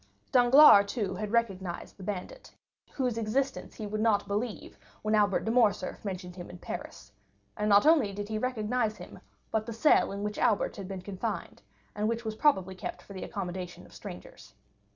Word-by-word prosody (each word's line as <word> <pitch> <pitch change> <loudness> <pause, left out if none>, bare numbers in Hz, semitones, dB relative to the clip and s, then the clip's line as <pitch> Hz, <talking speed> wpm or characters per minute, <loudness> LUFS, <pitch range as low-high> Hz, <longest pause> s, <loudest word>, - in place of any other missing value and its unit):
Danglars, 245 -4 +8
too, 205 -6 -2
had 205 +2 -4
recognized 195 -7 -2
the - - -14
bandit, 205 - -6 0.4
whose 250 -4 -1
existence 260 +5 -2
he 215 - -6
would 215 +1 -3
not 215 -3 +2
believe 210 +2 -4 0.2
when 215 0 0
Albert 205 -2 +3
de 220 - 0
Morcerf 230 -4 +1
mentioned 185 -3 -5
him 175 - -8
in 180 - -9
Paris; 100 - -8 0.4
and 210 - -1
not 205 0 +6
only 300 -10 +5
did 205 +1 -5
he 215 0 -2
recognize 225 -2 -1
him, - - -11 0.3
but 220 0 -1
the 230 - -4
cell 230 +7 +4
in 200 +1 -5
which 210 0 -3
Albert 210 - +1
had 195 -2 -6
been 190 -2 -6
confined, 190 -1 -5 0.3
and 210 +1 -1
which 230 0 -3
was 220 - -2
probably 205 -7 +2
kept 185 - -7
for 200 - -12
the 190 - -7
accommodation 180 -3 -6
of - - -18
strangers. - - -11
210 Hz, 185 wpm, -29 LUFS, 195-230 Hz, 0.4 s, Danglars